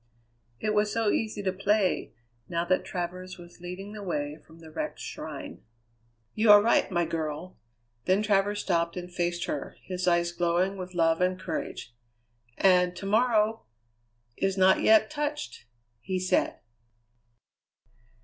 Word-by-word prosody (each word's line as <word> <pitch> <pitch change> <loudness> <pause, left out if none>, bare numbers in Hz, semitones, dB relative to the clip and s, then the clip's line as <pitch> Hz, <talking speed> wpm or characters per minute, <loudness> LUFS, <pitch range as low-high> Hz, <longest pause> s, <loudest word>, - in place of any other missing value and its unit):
It 215 - 0
was 210 0 +2
so 225 -2 +1
easy 215 -2 -2
to 190 -1 0
play, 200 0 +1 0.4
now 170 0 -1
that 185 +1 +1
Travers 180 +1 -5
was 175 0 -14
leading 185 +3 -7
the 215 - -7
way 150 -5 -3
from 160 - -16
the 160 -1 -13
wrecked - - -4
shrine. - - -7 0.7
"You 215 0 +2
are 205 0 +11
right, 225 +3 +3
my 175 -3 +1
girl!" 160 +1 -4 0.5
Then 190 +3 +3
Travers 205 0 +2
stopped 170 -1 0
and 180 0 -7
faced 175 -1 -1
her, 145 - -5
his 185 -1 -4
eyes 170 0 +3
glowing 175 +3 +1
with 185 -1 -7
love 165 0 +2
and 185 0 +1
courage. 160 -8 -5 0.6
"And 180 -2 +4
to 195 - -7
morrow 220 - +2 0.7
is 195 0 0
not 190 0 +5
yet 220 0 +5
touched!" 295 - -4 0.3
he 185 +11 -3
said. 185 0 +1
185 Hz, 145 wpm, -28 LUFS, 175-205 Hz, 0.7 s, are